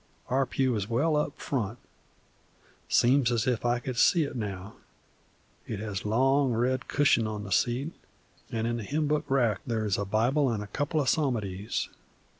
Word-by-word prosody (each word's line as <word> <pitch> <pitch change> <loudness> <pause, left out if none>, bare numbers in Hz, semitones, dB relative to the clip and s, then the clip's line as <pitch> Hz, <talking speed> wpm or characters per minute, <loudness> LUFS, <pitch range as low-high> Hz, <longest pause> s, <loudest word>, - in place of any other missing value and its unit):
Our 130 +1 +2
pew 130 -1 +1
is 105 -1 -3
well 150 +7 +2
up 150 - 0
in - - -31
front, 115 -5 -2 1.1
seems 125 0 +4
as 115 0 +1
if 125 -5 0
I 120 0 +2
could 125 +1 -5
see 170 -3 +5
it 140 - -5
now. 100 -4 -5 0.9
It 110 - -3
has 105 -3 -4
a - - -5
long 135 +4 +3
red 125 +3 0
cushion 135 -6 +3
on 105 -1 -4
the 100 - -8
seat, 125 - +1 0.6
and 115 -1 -1
in 120 0 -1
the 115 - -5
hymn 150 +8 -1
book 150 +1 0
rack 120 -7 +2
there 115 -2 -1
is 100 -2 0
a 100 - -1
Bible 120 +7 +2
an' 110 - -1
a - - -5
couple 145 +9 -1
of 140 - 0
Psalmodies. 110 -10 -1
120 Hz, 190 wpm, -28 LUFS, 110-135 Hz, 1.1 s, see